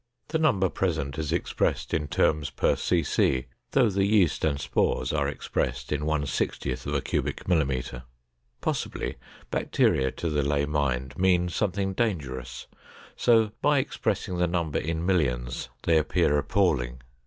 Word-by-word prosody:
The 160 Hz, +1 st, 0 dB
number 120 Hz, -12 st, +3 dB
present 80 Hz, -6 st, -2 dB
is 75 Hz, -2 st, -2 dB
expressed -, -, -1 dB
in 75 Hz, -1 st, 0 dB
terms 75 Hz, 0 st, +1 dB
per 70 Hz, -, +1 dB
cc 70 Hz, -6 st, +1 dB, 0.2 s
though 130 Hz, -3 st, +4 dB
the 95 Hz, +1 st, +1 dB
yeast 100 Hz, -6 st, +3 dB
and 70 Hz, -3 st, +1 dB
spores 65 Hz, -1 st, 0 dB
are 70 Hz, -2 st, +1 dB
expressed 65 Hz, -3 st, -3 dB
in 75 Hz, 0 st, -1 dB
1 75 Hz, -2 st, 0 dB
60 65 Hz, -1 st, -1 dB
c 65 Hz, -, -7 dB
mm. 65 Hz, -7 st, -1 dB, 0.6 s
Possibly -, -, -2 dB, 0.3 s
bacteria 65 Hz, 0 st, +2 dB
to 85 Hz, +4 st, -4 dB
the 75 Hz, -1 st, +1 dB
lay 70 Hz, 0 st, +1 dB
mind 70 Hz, -2 st, -1 dB
mean 90 Hz, -1 st, +3 dB
something 95 Hz, +1 st, -1 dB
dangerous, 70 Hz, -, -3 dB, 0.5 s
so 115 Hz, -3 st, +4 dB
by 145 Hz, +1 st, +4 dB
expressing 100 Hz, -8 st, -1 dB
the 90 Hz, -, +3 dB
numbers 85 Hz, -3 st, -1 dB
in 85 Hz, +1 st, -1 dB
millions 65 Hz, -10 st, 0 dB
they 80 Hz, -1 st, +4 dB
appear 75 Hz, -1 st, +2 dB
appalling. 70 Hz, -7 st, +1 dB
75 Hz, 140 wpm, -27 LUFS, 70-95 Hz, 0.6 s, though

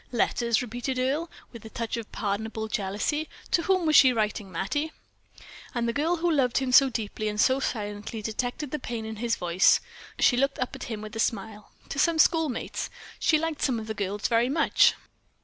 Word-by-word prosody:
"Letters!" 235 Hz, -1 st, +1 dB
repeated 245 Hz, +2 st, -4 dB
Earle, 280 Hz, +7 st, 0 dB, 0.2 s
with 230 Hz, -3 st, -11 dB
a 220 Hz, -, -9 dB
touch 230 Hz, 0 st, -3 dB
of 230 Hz, -2 st, -7 dB
pardonable 220 Hz, +1 st, -3 dB
jealousy. 215 Hz, +10 st, -2 dB, 0.2 s
"To 335 Hz, -, +3 dB
whom 370 Hz, 0 st, +1 dB
was 310 Hz, -1 st, +3 dB
she 260 Hz, -2 st, +8 dB
writing, 210 Hz, -4 st, -2 dB
Mattie?" 290 Hz, -, -2 dB, 0.8 s
And 235 Hz, -1 st, 0 dB
the 235 Hz, -, 0 dB
girl 315 Hz, +7 st, +1 dB
who 345 Hz, 0 st, 0 dB
loved 265 Hz, -6 st, +2 dB
him 265 Hz, -1 st, 0 dB
so 270 Hz, +1 st, +7 dB
deeply 215 Hz, -2 st, -3 dB
and 210 Hz, 0 st, -3 dB
so 260 Hz, +4 st, +4 dB
silently 210 Hz, -2 st, -4 dB
detected 245 Hz, +6 st, -3 dB
the 300 Hz, -, -2 dB
pain 235 Hz, -3 st, -5 dB
in 220 Hz, 0 st, -6 dB
his 230 Hz, +1 st, 0 dB
voice. 175 Hz, +1 st, +4 dB, 0.4 s
She 245 Hz, -, +4 dB
looked 275 Hz, +2 st, +1 dB
up 255 Hz, -, -3 dB
at -, -, -7 dB
him 215 Hz, -2 st, -5 dB
with 215 Hz, +1 st, -8 dB
a -, -, -4 dB
smile. 220 Hz, -2 st, -2 dB, 0.2 s
"To 280 Hz, -, -3 dB
some 335 Hz, +1 st, +3 dB
schoolmates. 315 Hz, -4 st, +1 dB, 0.3 s
She 315 Hz, -, +3 dB
liked 320 Hz, -1 st, -3 dB
some 250 Hz, -5 st, +1 dB
of 220 Hz, -, -6 dB
the 220 Hz, -, -4 dB
girls 205 Hz, 0 st, -2 dB
very 235 Hz, +1 st, +2 dB
much." 320 Hz, +4 st, +4 dB
235 Hz, 200 wpm, -27 LUFS, 215-280 Hz, 0.8 s, she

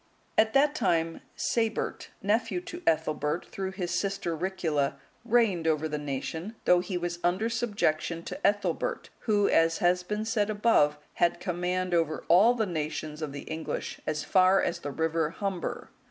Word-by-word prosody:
At 220 Hz, 0 st, +3 dB
that 285 Hz, +2 st, +4 dB
time, 165 Hz, -, 0 dB
Sabert, 225 Hz, -2 st, -1 dB, 0.2 s
nephew 220 Hz, -, +1 dB
to 350 Hz, 0 st, -8 dB
Ethelbert 155 Hz, 0 st, +1 dB
through 190 Hz, -1 st, -5 dB
his 180 Hz, -3 st, -3 dB
sister 180 Hz, -2 st, -1 dB
Ricula, 160 Hz, -5 st, -1 dB, 0.3 s
reigned 220 Hz, -8 st, +2 dB
over 160 Hz, 0 st, +1 dB
the 150 Hz, -1 st, -3 dB
nation, 155 Hz, +8 st, -4 dB
though 180 Hz, -, +6 dB
he 180 Hz, +1 st, -3 dB
was 175 Hz, 0 st, -3 dB
under 185 Hz, +6 st, +1 dB
subjection 200 Hz, -8 st, -1 dB
to -, -, -6 dB
Ethelbert, 205 Hz, 0 st, -1 dB
who, 205 Hz, -3 st, +2 dB
as 165 Hz, 0 st, +3 dB
has 180 Hz, +1 st, +3 dB
been 210 Hz, +4 st, -3 dB
said 220 Hz, -2 st, +1 dB
above, 205 Hz, -9 st, +3 dB, 0.2 s
had 175 Hz, 0 st, +3 dB
command 180 Hz, 0 st, -1 dB
over 165 Hz, -2 st, +1 dB
all 210 Hz, +8 st, +6 dB
the 225 Hz, -2 st, +1 dB
nations 155 Hz, -3 st, -4 dB
of 155 Hz, -2 st, -3 dB
the 140 Hz, -, -6 dB
English 160 Hz, 0 st, -5 dB
as 150 Hz, -1 st, -1 dB
far 185 Hz, 0 st, +4 dB
as -, -, -1 dB
the 145 Hz, -, -5 dB
river 160 Hz, +1 st, 0 dB
Humber. 195 Hz, -1 st, -4 dB
180 Hz, 160 wpm, -28 LUFS, 160-205 Hz, 0.3 s, though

